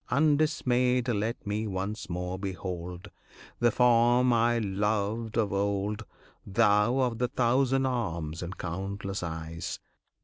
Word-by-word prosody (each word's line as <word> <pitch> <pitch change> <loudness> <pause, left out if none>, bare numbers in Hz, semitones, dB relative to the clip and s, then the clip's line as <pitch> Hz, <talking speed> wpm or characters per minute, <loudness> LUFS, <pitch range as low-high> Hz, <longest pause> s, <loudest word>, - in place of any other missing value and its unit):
Undismayed 130 -4 +2
Let 115 +1 -2
me 105 +2 -2
once 100 +2 -4
more 90 +1 -3
behold 90 -2 -5 0.5
The 120 - +4
form 120 +1 +4
I 120 +1 +3
loved 105 +2 -1
of 105 -4 +1
old, 100 +2 -1 0.4
Thou 105 +4 +3
of 120 -3 0
the 125 - +2
thousand 130 +2 +2
arms 85 -11 -2
and 90 +2 -6
countless 95 +2 -4
eyes! 80 0 -5
105 Hz, 115 wpm, -29 LUFS, 95-120 Hz, 0.5 s, The